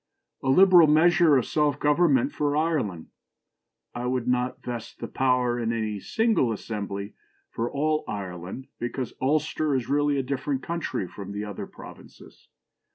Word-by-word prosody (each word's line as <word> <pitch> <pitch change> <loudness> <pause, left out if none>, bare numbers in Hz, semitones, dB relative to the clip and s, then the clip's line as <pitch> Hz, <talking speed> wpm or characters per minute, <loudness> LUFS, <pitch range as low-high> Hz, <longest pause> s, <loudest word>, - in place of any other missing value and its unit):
A 135 - -2
liberal 180 +2 +7
measure 160 +1 +5
of 125 - +2
local - - -9
self 150 -2 +1
government 175 - +3
for 145 0 0
Ireland. 140 - -1 0.8
I 120 +1 -3
would 125 -1 -1
not 125 0 -1
vest 120 -2 -6
the - - -6
power 125 -2 +1
in 115 -1 -1
any 110 -3 -2
single 220 - +1
assembly 100 -2 -5 0.4
for 115 +1 -2
all 155 +2 0
Ireland, 95 +4 -6
because 120 +1 -4
Ulster 150 +1 +1
is 130 -3 -2
really 145 0 +2
a 135 - 0
different 135 0 -2
country 155 - -3
from 100 +2 -8
the 105 +1 -4
other 105 -2 -6
provinces. - - -14
130 Hz, 155 wpm, -26 LUFS, 115-150 Hz, 0.8 s, liberal